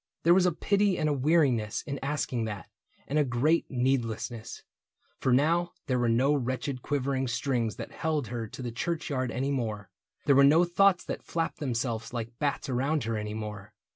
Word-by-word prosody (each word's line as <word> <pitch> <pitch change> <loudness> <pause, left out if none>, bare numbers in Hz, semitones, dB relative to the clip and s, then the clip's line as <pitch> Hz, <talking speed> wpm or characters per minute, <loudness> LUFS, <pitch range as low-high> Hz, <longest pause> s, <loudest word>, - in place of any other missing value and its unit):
There 170 - +6
was 180 0 +4
a - - +3
pity 200 +3 +1
and 155 - 0
a 150 - +2
weariness 135 -7 +2
In 140 -1 -5
asking 135 -4 -1
that, 105 -5 -6 0.4
and 150 +2 +1
a - - +5
great 140 +6 +1
needlessness; 120 -3 -2 0.6
For 130 - +1
now 165 +7 +2
there 130 -2 0
were 120 -1 +2
no 130 +5 +3
wretched 130 -1 -2
quivering 135 -1 -1
strings 120 -2 -1
That - - -7
held 155 -7 -2
her 115 -2 -4
to 130 - -8
the 120 - -3
churchyard 140 -1 -2
any 135 +4 -1
more: 110 -7 -3 0.3
There 140 - +5
were 140 - +7
no 155 +5 +6
thoughts 180 +1 +3
that - - -4
flapped 165 -1 -3
themselves 115 -4 -2
like 115 0 -5
bats 145 -2 -1
Around 135 +4 0
her 115 0 -2
any 105 0 -4
more. 105 -2 -7
130 Hz, 185 wpm, -28 LUFS, 115-150 Hz, 0.6 s, were